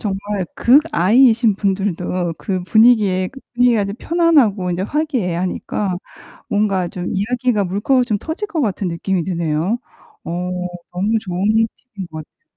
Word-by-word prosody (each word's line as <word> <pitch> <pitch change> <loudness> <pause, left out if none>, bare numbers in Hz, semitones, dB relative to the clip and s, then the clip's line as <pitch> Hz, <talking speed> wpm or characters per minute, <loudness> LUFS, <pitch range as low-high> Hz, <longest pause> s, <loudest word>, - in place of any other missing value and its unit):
정말 200 -1 -3
극I신 235 - +4
분들도 185 -3 -1
그 185 -3 -3
분위기에 210 -4 +4
그 270 +1 -13
분위기가 240 -3 +3
이제 200 0 -3
편안하고 260 - +2
인제 175 +1 -2
화기애애하니까 195 - -2 0.5
뭔가 195 -4 +1
좀 180 +1 -6
이야기가 225 +1 0
물꼬 205 +8 +1
좀 215 -4 -1
터질 325 - -5
것 335 -6 -2
같은 200 -6 -1
느낌이 175 +2 -1
드네요. 170 +4 -1 0.5
어 - - -6 0.6
너무 205 +5 0
좋은 185 -1 -3 0.5
팁인 190 -4 -6
것 155 0 -7
같아 - - -53
200 Hz, 305 characters per minute, -19 LUFS, 185-240 Hz, 0.6 s, 극I신